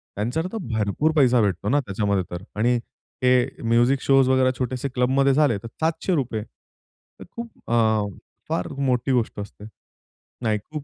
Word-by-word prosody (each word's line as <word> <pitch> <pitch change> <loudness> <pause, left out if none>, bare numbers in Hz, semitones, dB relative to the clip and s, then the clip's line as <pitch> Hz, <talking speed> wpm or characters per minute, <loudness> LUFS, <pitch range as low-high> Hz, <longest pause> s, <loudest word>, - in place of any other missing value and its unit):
त्यांच्या 120 +10 -1
तर - - -2 0.2
भरपूर 110 +9 +1
पैसा 125 -5 +4
भेटतो 100 -1 0
ना 145 - +3
त्याच्यामध्ये 100 -5 -1
तर 90 +1 -6 0.2
आणि 120 +2 +3 0.5
हे 125 -1 +2
म्युझिक 120 +4 +3
शोज 135 -1 +4
वगैरा 130 0 +4
छोटेसे 130 +2 -2
क्लबमध्ये 130 +2 +2
झाले 145 -6 +3
तर - - -6
₹700 160 - 0
तर - - -21
खूप 235 0 -5 1.0
फार 90 - -1
मोठी 130 -1 0
गोष्ट 120 -4 0
असते. 105 0 -9 0.8
नाही 110 -2 +1
खूप 150 -2 -5
125 Hz, 145 wpm, -23 LUFS, 110-135 Hz, 1.0 s, पैसा